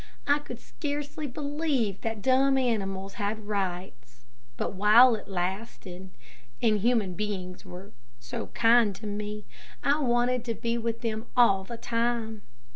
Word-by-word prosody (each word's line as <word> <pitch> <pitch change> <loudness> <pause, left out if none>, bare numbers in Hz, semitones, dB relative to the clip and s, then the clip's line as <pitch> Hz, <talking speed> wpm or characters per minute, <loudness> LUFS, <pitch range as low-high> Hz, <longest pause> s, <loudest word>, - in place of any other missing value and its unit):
I 285 +1 +3
could 245 -5 -9
scarcely 295 +1 -5
believe 285 - -1
that 225 -3 -4
dumb 265 +1 +4
animals 195 -6 -1
had 210 +1 -2
rights; 175 - -4 0.3
but - - -2
while 215 +6 +7
it 215 - -5
lasted, 190 0 -4 0.5
and 215 -2 +2
human 220 -4 +1
beings 185 -2 -5
were 185 +2 -10 0.3
so 120 0 -6
kind 230 -3 +4
to 215 - -10
me, 210 0 -5 0.4
I 285 +2 +3
wanted 245 -2 +1
to 230 -2 -2
be 230 +2 -2
with 230 0 -3
them 225 -1 -3
all 195 -6 +5
the 235 +4 -7
time. 230 -2 -1
220 Hz, 140 wpm, -28 LUFS, 195-245 Hz, 0.5 s, while